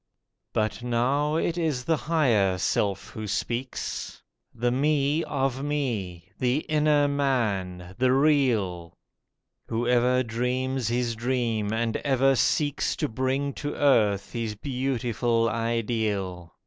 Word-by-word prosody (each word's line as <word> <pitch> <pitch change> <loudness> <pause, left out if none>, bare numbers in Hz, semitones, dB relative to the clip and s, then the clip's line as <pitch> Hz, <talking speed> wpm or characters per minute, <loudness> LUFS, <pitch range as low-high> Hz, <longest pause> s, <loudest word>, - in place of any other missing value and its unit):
But 110 +2 -1
now 130 +5 +1
it 170 +1 0
is 150 -7 -1
the 165 - +2
Higher 125 - +2
Self 100 +3 -1
who 110 -1 -6
speaks— 120 +5 -4 0.3
The 120 +1 -1
Me 145 +3 +1
of 135 0 -1
me—the 120 - -2
inner 150 -2 +2
Man—the 115 -6 0
real— 120 - +1 0.7
Whoever 125 +2 +2
dreams 125 +2 -1
his 120 0 0
dream 115 -3 -1
and 115 0 0
ever 135 -1 +2
seeks 145 +2 +1
To 150 - -1
bring 135 +3 -1
to 145 +2 -4
earth 105 -9 +2
his 115 -3 -3
beautiful 120 -2 0
ideal. 110 -6 -2
125 Hz, 110 wpm, -26 LUFS, 110-140 Hz, 0.7 s, the